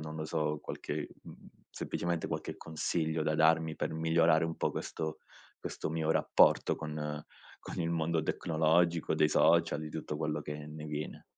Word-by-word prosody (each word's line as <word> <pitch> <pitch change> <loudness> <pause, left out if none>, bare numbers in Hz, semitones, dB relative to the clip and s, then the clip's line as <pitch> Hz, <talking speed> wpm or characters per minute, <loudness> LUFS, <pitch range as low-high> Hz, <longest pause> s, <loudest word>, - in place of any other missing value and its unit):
non 75 0 -6
lo 80 - -3
so, 75 -1 -1
qualche, 75 0 -4 0.2
mhmm, - - -12 0.2
semplicemente 85 -1 -2
qualche - - -4
consiglio 80 0 -1
da 75 0 +1
darmi 80 0 +3
per - - -2
migliorare 80 0 +3
un 80 - -4
po' - - 0
questo 80 -1 -4 0.4
questo - - -4
mio 80 -1 0
rapporto - - +4
con 75 -1 -4 0.4
con - - -7
il 85 0 0
mondo 80 -1 +1
tecnologico, 80 +1 +2
dei 75 - +4
social 75 - +4
di 75 0 -6
tutto 75 -1 -4
quello 75 -1 -1
che 75 0 -6
ne 75 0 -8
viene. 75 0 -5
80 Hz, 165 wpm, -32 LUFS, 75-80 Hz, 0.4 s, rapporto